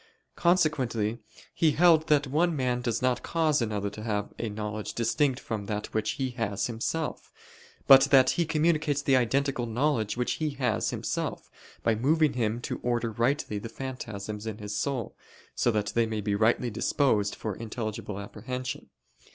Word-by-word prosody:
Consequently 130 - +1 0.3
he 160 -3 +3
held 160 -1 +5
that 150 -1 +3
one 160 +5 +1
man 125 -3 0
does 120 -1 -2
not 130 -1 +1
cause 155 -4 +1
another 105 -3 -2
to 105 - -9
have 105 -2 -2
a 115 - -2
knowledge 105 0 -5
distinct 130 +3 +1
from 110 -6 -5
that 105 0 -4
which 110 -1 0
he 130 -2 -2
has 105 -5 -2
himself; 125 +7 -3 0.5
but 135 0 +9
that 135 -2 +5
he 175 - +1
communicates 155 -2 +1
the 135 - +4
identical 130 0 +1
knowledge 120 -2 0
which 125 - -1
he 155 - +1
has 135 -3 0
himself, - - -3 0.3
by 115 - +3
moving 150 +7 +2
him 115 -2 -1
to - - -4
order 120 -1 0
rightly 115 -1 0
the 115 - -7
phantasms 110 -5 -6
in 110 -2 -4
his 105 -1 -5
soul, 130 -2 -2 0.4
so - - +1
that 105 -3 0
they 115 -1 +2
be 105 -2 -2
rightly 115 +3 +2
disposed 110 -2 +1
for 110 - -4
intelligible 110 -2 -5
apprehension. 125 +5 -6
120 Hz, 160 wpm, -28 LUFS, 110-140 Hz, 0.5 s, but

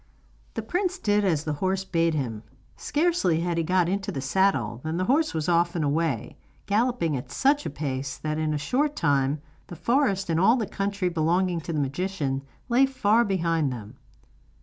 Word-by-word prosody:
The - - -3
prince 365 +1 -1
did 210 - +1
as 165 -6 +1
the 155 - -2
horse 190 0 0
bade 165 -3 +1
him. 115 -7 -3 0.3
Scarcely 295 - +1
had 170 -1 -1
he - - +1
got 180 +1 +2
into 195 +2 -2
the 135 - -4
saddle 135 - +1
than 160 +1 -2
the 185 - 0
horse 285 - +2
was 155 -1 -1
off 170 0 +2
and 160 -3 0
away, 140 -6 -1 0.3
galloping 210 - +1
at 125 - -5
such 285 +2 +2
a - - -2
pace 135 -3 -4
that, 155 0 -3
in 155 -1 0
a 150 - 0
short 285 - 0
time, 140 - +1 0.2
the 175 - -8
forest 215 - +1
and 165 - +2
all 220 +7 +5
the 235 -4 -1
country 200 -1 -2
belonging 175 +1 +1
to 170 - -5
the 155 - -1
magician 140 -1 -2 0.3
lay 260 +2 +4
far 230 -3 +3
behind 165 - 0
them. 115 -1 -8
170 Hz, 190 wpm, -26 LUFS, 150-205 Hz, 0.3 s, all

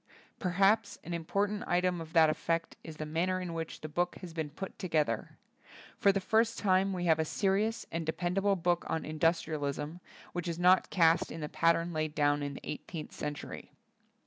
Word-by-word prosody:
Perhaps 195 +4 +2
an 175 - -7
impor 175 +4 0
tant 205 0 -4
item 180 0 +1
of 160 0 -9
that 165 -2 +7
effect 165 +2 -1
is 160 -2 -9
the 155 - -4
manner 175 +4 0
in 180 -2 -4
which 165 -1 -5
the 155 - -5
book 175 +4 -1
has 175 -3 -8
been 160 -2 -3
put 170 +6 -8
to 185 - -3
gether. 150 -9 0 0.6
For 200 - +5
the 195 - 0
first 225 +4 +2
time 195 -1 +3
we 180 -2 -2
have 160 -2 +4
a - - +3
serious 200 +7 0
and 165 0 -2
dependable 180 +5 +1
book 175 -1 +1
on 160 - -1
indus 165 +2 +1
trialism, 150 +1 -3 0.3
which 175 0 -3
is 170 -1 -2
not 180 +2 +4
cast 165 -2 +3
in 165 - -6
the 150 - -4
pat 165 0 +3
tern 170 +1 -3
laid 155 -1 -2
down 145 -1 +2
in 140 -1 -3
the - - -9
eighteenth 155 +1 -6
cen 150 0 -4
tury. - - -8
170 Hz, 205 wpm, -31 LUFS, 155-185 Hz, 0.6 s, that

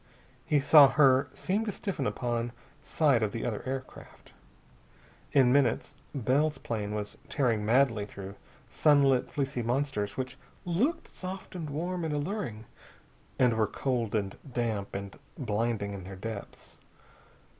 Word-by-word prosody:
He 150 - +3
saw 145 0 +8
her 135 -2 +4
seem 200 +4 -1
to 210 - -1
stiffen 185 -10 -3
upon 120 -1 -2 0.3
sight 145 -5 +2
of 105 -2 0
the 115 - -3
other 110 -4 -2
aircraft. 130 0 -7 1.0
In 130 -3 +5
minutes 140 -2 +2 0.2
Bell's 140 +5 +1
plane 105 -2 -3
was 105 -1 -5
tearing 120 -7 +1
madly 115 -2 +3
through 100 -1 -8 0.3
sunlit 140 -4 +3
fleecy 140 -3 -2
monsters 120 -4 -1
which 130 -1 -4 0.3
looked 215 - 0
soft 185 +1 -7
and 165 -5 -5
warm 175 +4 -3
and 155 -2 -1
alluring, 145 - -3 0.7
and 125 -2 +4
were 110 -1 +2
cold 120 -2 -1
and 100 -2 -1 0.2
damp 115 -6 -2
and 100 0 -6 0.2
blinding 110 -3 -1
in 95 -2 -7
their 95 +1 -8
depths. 105 +1 -8
125 Hz, 135 wpm, -29 LUFS, 110-145 Hz, 1.0 s, saw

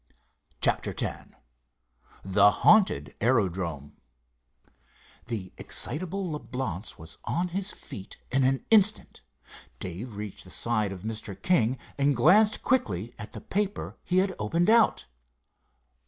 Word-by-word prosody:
CHAPTER - - +1
X - - -4 1.0
THE 100 +1 +5
HAUNTED 145 - +3
AERODROME 90 - 0 1.3
The 105 -6 -5
excitable 185 +7 +1
Leblance 125 - -5
was 80 0 -10
on 180 +1 -1
his 195 +3 -3
feet 95 0 -10
in 135 0 +2
an 135 +1 +1
instant. 215 -1 +3 0.6
Dave 100 +6 -6
reached 105 -1 -7
the 90 - -14
side 110 -1 0
of 95 -1 -8
Mr. 110 -2 -5
King 130 -8 +2 0.2
and 140 0 +3
glanced 205 - +4
quickly 115 - 0
at 105 - -9
the - - -8
paper 205 0 -2
he 180 - 0
had 190 +1 +2
opened 165 - +1
out. 230 -1 +4
120 Hz, 120 wpm, -27 LUFS, -, 1.3 s, THE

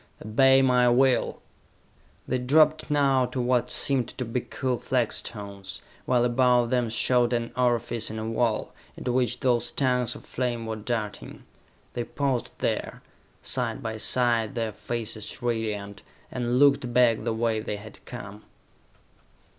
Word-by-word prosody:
Obey 135 +5 +5
my 125 -1 +4
will!" 130 +1 +2 0.8
They 130 - 0
dropped 155 +5 +3
now 135 -3 +3
to 130 - -5
what 125 0 +1
seemed 130 -4 +1
to 125 - -2
be 115 +2 -2
cool 130 -1 -3
flagstones, 100 -6 -3 0.3
while 125 -1 +3
above 125 -1 +3
them 125 -2 +1
showed 120 +2 +2
an 115 -1 -1
orifice 120 -2 0
in 110 - -6
a 110 0 -4
wall, 115 -1 -1 0.2
into 125 - -2
which 125 0 0
those 120 -3 +1
tongues 125 -3 +1
of - - -12
flame 120 -2 -2
were 110 0 -3
darting. 110 -1 -5 0.5
They 120 - -2
paused 135 -1 -2
there, - - -2 0.4
side 125 0 -2
by 110 -1 -3
side, 120 +1 +1
their 115 -2 -1
faces 110 0 -5
radiant, 110 -4 -3 0.3
and 120 -1 -1
looked 140 -3 +4
back 120 -2 +3
the 115 - -1
way 110 0 0
they 110 -1 -4
had 105 +1 -12
come. 105 -4 -9
120 Hz, 145 wpm, -26 LUFS, 115-125 Hz, 0.8 s, Obey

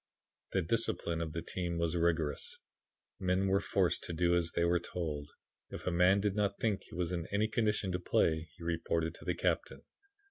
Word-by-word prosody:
"The 95 - +2
discipline 85 -4 +1
of 80 -2 -3
the 85 - -3
team 85 -1 -2
was 85 0 0
rigorous; 80 -4 0 0.6
men 95 +1 +1
were 95 +1 +3
forced - - +1
to 85 - -4
do 85 +1 +2
as 85 -1 +2
they 85 - +2
were 85 +1 +3
told. 75 -5 -4 0.4
If - - -7
a 90 - +1
man 90 +3 +5
did 100 -1 +1
not 100 -1 +1
think 105 -4 +1
he - - -12
was 90 -1 -1
in 85 -2 -2
any 105 +2 +2
condition 105 -3 +1
to 90 - -1
play 80 -2 +1
he - - -10
reported 85 -1 0
to - - -12
the - - 0
captain. - - -1
85 Hz, 200 wpm, -33 LUFS, 85-95 Hz, 0.6 s, man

